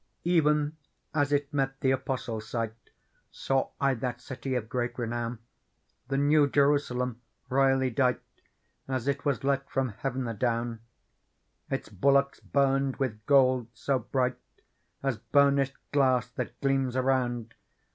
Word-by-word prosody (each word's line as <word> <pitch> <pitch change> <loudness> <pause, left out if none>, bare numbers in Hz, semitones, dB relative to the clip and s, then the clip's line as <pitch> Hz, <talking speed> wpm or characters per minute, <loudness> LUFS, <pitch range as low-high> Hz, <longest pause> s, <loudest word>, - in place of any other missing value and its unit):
Even 150 -3 +2 0.4
as 145 -2 +1
it 145 -1 0
met 135 -1 -1
the 130 - +3
Apostle's 125 -4 -3
sight. 115 -2 -2 0.6
Saw 135 -1 -1
I 140 -1 +3
that 125 0 -3
city 130 +1 -5
of 115 -3 -2
great 120 +1 -2
renpwn, 120 0 -3 0.7
The 135 0 -1
New 145 +1 +4
Jerusalem, 125 -4 +1 0.3
royall/ 135 0 +3
dight 125 0 +2 0.7
As 130 -1 -2
it 140 +1 -1
was 140 -2 0
let 140 0 0
from 135 -2 0
heaven 130 +4 -3
adowP 115 0 -1 0.9
Its - - -3
bulwarks 140 +7 +2
burned 135 -1 +1
with 110 -6 -2
gold^so 130 -1 +3
bright, 125 -1 0 0.6
As 135 -4 0
burnished 140 -1 +3
glass 130 -4 +2
that - - -5
gleams 135 -2 +1
around. 125 -3 0
130 Hz, 125 wpm, -28 LUFS, 125-140 Hz, 0.9 s, New